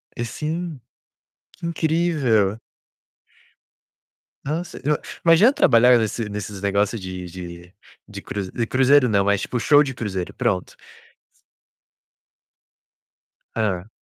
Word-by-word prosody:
É 120 - -3
sim. 155 +5 -4 0.8
Que - - -7
incrível. 155 - +1 1.9
Nossa, 165 +5 -4
eu 150 +1 +2 0.3
imagina 175 - +6
trabalhar 125 - +5
nesse 110 0 -2
nesses 100 -1 -6
negócio 100 +2 0
de 95 -1 -7
de 85 0 -10 0.3
de - - -8
cru 100 -3 -5
de 115 -2 -2
cruzeiro 130 +1 +4
não, 100 -2 +2
mas 100 -1 +2
tipo 125 - -3
show 145 +5 +5
de 135 -3 -4
cruzeiro, 95 -6 -4
pronto. 90 - -1 2.8
Hã. 100 -3 -1
115 Hz, 105 wpm, -22 LUFS, 100-150 Hz, 2.8 s, imagina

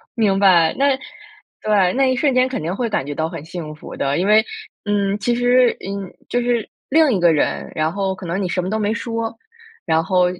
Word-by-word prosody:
明 210 -5 +2
白。 180 -5 +4
那， 275 -1 +3 0.6
对， 200 -4 +2
那 265 0 +2
一 - - +1
瞬 275 +1 +2
间 255 0 +3
肯 260 - -3
定 170 +4 -3
会 235 +2 -2
感 210 -10 -1
觉 145 - -4
到 160 +2 -1
很 165 -3 -8
幸 160 -2 -7
福 155 - -10
的。 140 +1 -1
因 180 +3 0
为， 215 +1 +5 0.4
嗯， 200 -1 0
其 240 +4 0
实， 245 0 +3
嗯， 195 -1 -6
就 245 - 0
是 240 -2 -1 0.2
另 310 -2 +4
一 195 - +1
个 170 -1 +5
人， 150 - -1
然 155 +1 -1
后 195 -1 -1
可 185 - -10
能 175 +4 -2
你 180 - -2
什 180 - -1
么 180 - -4
都 215 - -1
没 210 0 0
说， 230 -1 -4 0.5
然 160 -1 +2
后 180 +2 +2
200 Hz, 240 characters per minute, -20 LUFS, 175-240 Hz, 0.6 s, 为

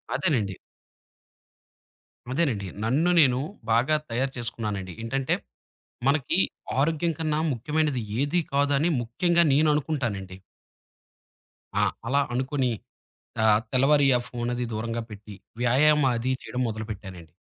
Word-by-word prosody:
అదేనండి. 110 - 0 1.8
అదేనండి. 130 - 0 0.2
నన్ను 140 +10 +2
నేను 130 -5 +5 0.3
బాగా 120 +7 +3
తయారు 130 +3 -1
చేసుకున్నానండి. 105 -6 -4
ఏంటంటే, 135 +3 0 0.7
మనకి 145 +4 +2 0.4
ఆరోగ్యం‌ 165 +3 +1
కన్నా 155 -1 0
ముఖ్యమైనది 150 +2 0 0.2
ఏది 145 +5 +1
కాదు 140 0 +2
అని 165 - +2
ముఖ్యంగా 170 +9 +2
నేను 155 +3 +4
అనుకుంటానండి. 120 - -2 1.4
ఆ! - - +4 0.2
అలా 140 +3 +3
అనుకోని 130 +1 0 0.7
ఆహ్, 105 -1 +5
తెల్లవారి 140 +2 +4
ఆ - - -1
ఫోన్ 120 0 -3
అది 120 0 -2
దూరంగా 115 +2 -3
పెట్టి 105 0 -10 0.3
వ్యాయామం 140 +4 +4
అది 130 +3 -1
చేయడం 125 - -4
మొదలుపెట్టానండి. 100 -6 -7
130 Hz, 110 wpm, -26 LUFS, 115-150 Hz, 1.8 s, నేను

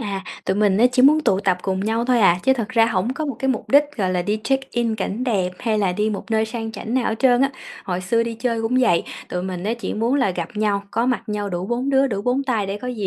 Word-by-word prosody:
À, 200 -4 -4 0.2
tụi 190 - 0
mình 205 -1 +2
á 245 - +6
chỉ 250 - +3
muốn 305 +3 +6
tụ 195 -9 +1
tập 185 -3 +1
cùng 190 -1 -1
nhau 225 +3 0
thôi 245 -2 +2
à, 175 -4 +5
chứ 265 - +4
thật 230 -5 -3
ra 230 -3 +3
hổng 225 +2 0
có 310 - -3
một 275 - -3
cái 265 - -1
mục 255 - -2
đích, 285 +2 +6
gọi 190 -4 0
là, 180 - 0
đi 210 +4 -1
check-in 250 -4 0
cảnh 215 +4 -3
đẹp, 195 -8 0
hay 220 -3 0
là 190 -3 +1
đi 210 +3 0
một 210 +2 -6
nơi 220 0 +2
sang 225 0 -5
chảnh 225 +1 -5
nào 255 -2 +1
hết - - 0
trơn 250 -2 +4
á. 275 - +3 0.3
Hồi 180 -1 -2
xưa 230 +6 +1
đi 230 0 -4
chơi 230 0 -2
cũng 240 +3 0
vậy, 200 -9 +3 0.3
tụi 180 0 -3
mình 185 -1 -5
á 220 +3 0
chỉ 235 - -5
muốn 230 +4 0
là 260 -7 +2
gặp 170 -2 -4
nhau, 205 -2 0
có 230 +2 0
mặt 255 - 0
nhau 205 -1 -2
đủ 180 0 -3
4 245 +5 -1
đứa, 270 0 +4
đủ 200 -5 -3
4 250 +4 +1
tay 230 -7 -1
để 195 +1 -4
có 250 - -6
gì 215 -6 -3
225 Hz, 295 wpm, -21 LUFS, 195-250 Hz, 0.3 s, á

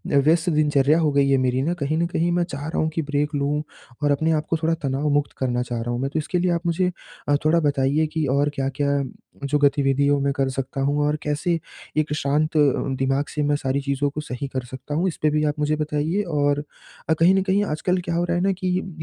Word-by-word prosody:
व्यस्त 160 +5 +3
दिनचर्या 150 0 +3
हो 155 -2 +2
गई 140 -1 +3
है 135 - +4
मेरी 130 0 +1
ना, 160 +6 0
कहीं 155 -2 -2
न 170 - +2
कहीं 175 0 0
मैं 175 0 +2
चाह 145 -2 -6
रहा 160 - -4
हूँ 155 - +1
कि 165 - +1
ब्रेक 145 0 -1
लूँ 145 +1 0 0.4
और 145 - +3
अपने 160 +3 +1
आप 155 -1 0
को 165 - +1
थोड़ा 165 +1 +2
तनाव 140 +2 0
मुक्त 145 0 +1
करना 125 -2 0
चाह 120 -2 -4
रहा 120 - -3
हूँ 120 - -2
मैं। 135 - -1
तो 160 - +1
इसके 180 +4 -2
लिए 180 0 +1
आप 170 0 -1
मुझे 180 +2 +1 0.4
अ, 145 - +4
थोड़ा 165 +2 +4
बताइए 145 0 +1
कि 160 -2 0
और 145 +2 +2
क्या-क्या 140 +1 0 0.5
जो 150 +2 +2
गतिविधियों 140 0 +3
में 140 0 +1
कर 135 -1 0
सकता 135 +1 -4
हूँ? 145 +2 +1
और 150 - +1
कैसे 155 +3 0 0.4
एक 155 -1 +1
शांत 150 +2 0
अ, - - +5 0.4
दिमाग 135 +2 +1
से 150 - 0
मैं 145 0 +2
सारी 140 -1 -1
चीज़ों 140 +1 0
को 150 +2 -5
सही 140 -1 -5
कर 130 -1 -2
सकता 130 +3 -6
हूँ? 175 +5 +1
इस 175 - -3
पे 155 - +3
भी 150 0 +1
आप 150 0 -1
मुझे 150 +1 +1
बताइए 150 +5 -1
और 145 -1 +1 0.6
कहीं 175 +4 +5
न 190 - +3
कहीं 195 +1 +2
आजकल 180 +2 0
क्या 170 - -1
हो 170 - +1
रहा 175 0 0
है - - 0
ना 195 - +3
कि 185 - -2
य 195 - -7
150 Hz, 250 wpm, -23 LUFS, 140-160 Hz, 0.6 s, अ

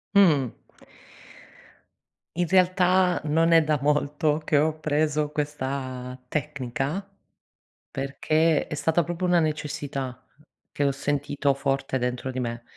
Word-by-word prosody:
Mh. 150 - +5 1.9
In 175 - +3
realtà, 185 0 +3
non 165 +2 +2
è 165 -1 +6
da 150 -2 +1
molto 150 +1 +1
che 145 - +3
ho 155 - +3
appreso 150 -1 0
questa 130 -4 -4
tecnica 145 +4 -3 0.9
perché 155 +3 +1
è - - -6
stata 160 +3 +2
proprio 175 +2 -3
una 180 -1 +4
necessità, 145 -4 -3 0.5
che 145 - -1
ho 140 - +3
sentito 140 0 0
forte 135 -1 -1
dentro 125 +1 -2
di 130 - -3
me; 120 -1 -4
145 Hz, 120 wpm, -25 LUFS, 135-160 Hz, 1.9 s, è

